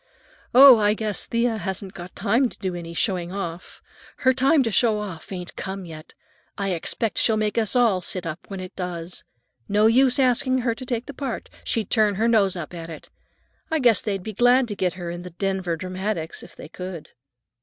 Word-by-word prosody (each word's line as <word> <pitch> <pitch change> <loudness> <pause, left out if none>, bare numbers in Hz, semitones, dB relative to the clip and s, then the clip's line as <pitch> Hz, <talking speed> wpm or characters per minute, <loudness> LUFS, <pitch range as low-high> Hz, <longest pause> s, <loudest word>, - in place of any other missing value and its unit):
"Oh, 265 -1 +10
I 210 0 +3
guess 215 -3 -3
Thea 235 -1 0
hasn't 190 -1 -5
got 175 0 -10
time 230 +6 +2
to - - -11
do 190 -3 -3
any 170 -1 -7
showing 180 -2 -1
off. 180 -3 -6 0.3
Her 260 0 +3
time 270 +3 +3
to 225 - -1
show 220 0 +3
off 200 -6 -7
ain't 180 -2 -6
come 190 -1 -5
yet. 155 -1 -11 0.4
I 200 -1 -1
expect 200 +6 -2
she'll 220 -2 +3
make 215 -1 0
us 225 +1 +1
all 225 -7 +3
sit 180 -1 -4
up 165 +1 -4
when 195 -2 -6
it 185 +1 -8
does. 175 -1 -6 0.5
No 210 +1 +3
use 250 +3 +4
asking 255 0 +2
her 230 - +2
to 255 +3 -9
take 240 -1 -2
the 285 - -8
part. 265 -3 -5
She'd 220 -4 -2
turn 215 -3 +3
her 225 +4 +1
nose 205 -5 +3
up 170 -1 -6
at 165 -1 -7
it. 160 - -10 0.6
I 320 - +1
guess 240 -8 +4
they'd 195 -3 -3
be 220 - -6
glad 245 +4 +4
to 205 - -4
get 180 -3 0
her 175 -2 -5
in 175 0 -6
the 180 - -8
Denver 185 -1 -2
Dramatics, 185 -1 -4
if - - -13
they - - -10
could." 180 -1 -8
200 Hz, 210 wpm, -23 LUFS, 180-230 Hz, 0.6 s, Oh